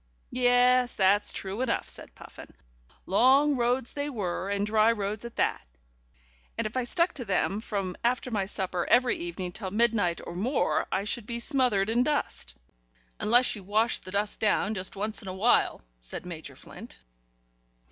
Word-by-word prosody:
"Yes, 250 0 +3
that's 200 +1 +3
true 195 +4 -4
enough," 255 -3 -1
said - - -11
Puffin. - - -13 0.5
"Long 265 +8 +4
roads 245 0 0
they 290 0 -3
were, 195 -6 -3
and 200 0 0
dry 215 +1 +4
roads 210 0 -3
at 235 - -8
that, - - 0 1.0
and 230 - -1
if 215 - -4
I 255 -1 0
stuck 340 +7 +1
to 255 - -6
them 195 0 0
from 195 -5 -3
after 250 +1 0
my 200 -4 -1
supper 185 -3 -3
every 250 0 +4
evening 175 +1 -5
till 190 +1 -5
midnight 210 -4 +1
or - - -7
more 240 +10 0
I 190 - 0
should 215 +1 -4
be 235 0 -3
smothered 235 -7 +2
in 235 +2 +3
dust." 255 - -1 0.6
"Unless 240 +3 +3
you 205 - -10
washed 215 +4 0
the 185 - -9
dust 205 +2 -2
down 215 0 +1
just 185 -2 -5
once 210 +2 -3
in 195 - -11
a 185 - -5
while," 220 +6 +2 0.2
said - - -9
Major 165 -3 -8
Flint. - - -12
215 Hz, 170 wpm, -28 LUFS, 195-245 Hz, 1.0 s, Long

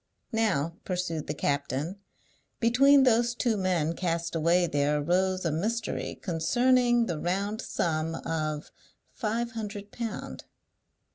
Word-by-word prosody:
"Now," 170 -8 +1
pursued 180 -4 -3
the 150 - -3
captain, 145 +7 -2 0.6
"between 270 +4 +5
those 240 -1 +3
two 240 -2 +1
men 180 -5 0
cast 170 -1 -2
away 170 +2 +3
there 145 -2 +1
arose 185 +4 +1
a 165 - +1
mystery 220 +8 -2
concerning 240 +7 +2
the 170 -7 -3
round 200 +5 -1
sum 160 0 -1
of 155 -2 -3 0.4
five 235 +1 -2
hundred 205 -3 -6
pound." 230 -2 -5
185 Hz, 120 wpm, -28 LUFS, 165-230 Hz, 0.6 s, between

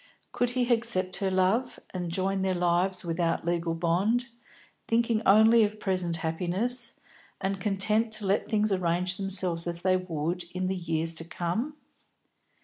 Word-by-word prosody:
Could 245 0 0
he 245 -1 +3
accept 225 -6 0
her 195 -2 0
love, 190 +7 +1
and 180 -2 -3
join 190 +2 -1
their 190 -1 0
lives 180 +1 +1
without 165 0 -1
legal 170 -1 -1
bond, 195 +9 +1 0.6
thinking 230 -1 +1
only 220 +3 +6
of 210 0 -2
present 185 -4 -1
happiness, 185 +10 -1 0.4
and 195 0 -2
content 215 +2 +1
to 215 -1 +1
let 195 +2 0
things 215 -1 +1
arrange 180 0 0
themselves 185 -3 0
as 170 0 -2
they 185 0 +3
would 175 0 -3
in 185 0 -1
the 190 +1 -1
years 165 -2 -1
to 165 - -6
come? 180 - -3
185 Hz, 150 wpm, -28 LUFS, 175-215 Hz, 0.6 s, only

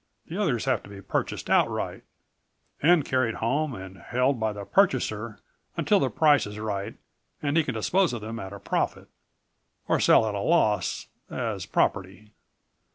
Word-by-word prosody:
The 165 - -8
others 130 - 0
have 130 -5 +1
to - - -14
be 100 -1 -10
purchased 100 - -3
outright - - +1 0.8
and 160 -1 +5
carried 130 -3 +1
home 140 +4 -1
and 95 0 -9
held 125 +7 0
by 110 -1 0
the 100 -1 -7
purchaser 115 - +1 0.4
until - - +3
the - - +1
price 150 -7 +3
is 105 0 -8
right 105 0 -4 0.5
and 145 0 0
he 165 - +4
can 125 -5 -4
dispose 180 - +2
of 120 -3 -5
them 110 +2 -6
at 95 -3 -7
a 100 - -7
profit. - - -2 0.8
Or - - +2
sell - - +5
at 105 - -2
a 100 - -2
loss, 110 -5 +1 0.2
as - - -3
property." 95 +2 -1
115 Hz, 165 wpm, -26 LUFS, 105-145 Hz, 0.8 s, and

